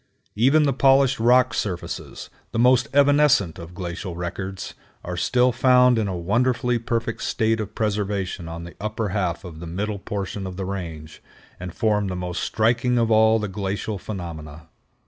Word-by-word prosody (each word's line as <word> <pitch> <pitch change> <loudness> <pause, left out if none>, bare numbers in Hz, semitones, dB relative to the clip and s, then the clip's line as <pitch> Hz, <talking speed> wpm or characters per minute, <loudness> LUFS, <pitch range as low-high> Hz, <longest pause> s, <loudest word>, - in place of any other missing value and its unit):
Even 135 +8 +4
the 140 -2 +2
polished 135 0 +4
rock 125 +1 +4
surfaces, 95 -6 -5 0.2
the - - -2
most 125 +1 +4
evanescent 140 - +3
of 85 +1 -10
glacial 90 0 -5
records, 95 +2 -5 0.3
are 90 - -5
still 125 +8 +2
found 125 0 +4
in 105 - 0
a 95 -2 -3
wonderfully 120 +6 +1
perfect 115 0 -2
state 110 0 0
of 105 - -5
preservation 100 -4 -2
on 85 +1 -7
the 85 - -10
upper 110 0 -2
half 95 -4 -2
of 85 -4 -9
the 85 - -7
middle 100 +4 -3
portion 100 -1 -4
of 90 -1 -8
the 95 - -3
range, 80 -5 -6 0.4
and 90 -1 -7
form 105 -3 +1
the 90 - -3
most 90 -1 -4
striking 120 +2 +1
of 115 -1 +1
all 110 0 +5
the 105 -1 -2
glacial 100 +1 -3
phenomena. 80 -5 -8
105 Hz, 165 wpm, -23 LUFS, 90-120 Hz, 0.4 s, all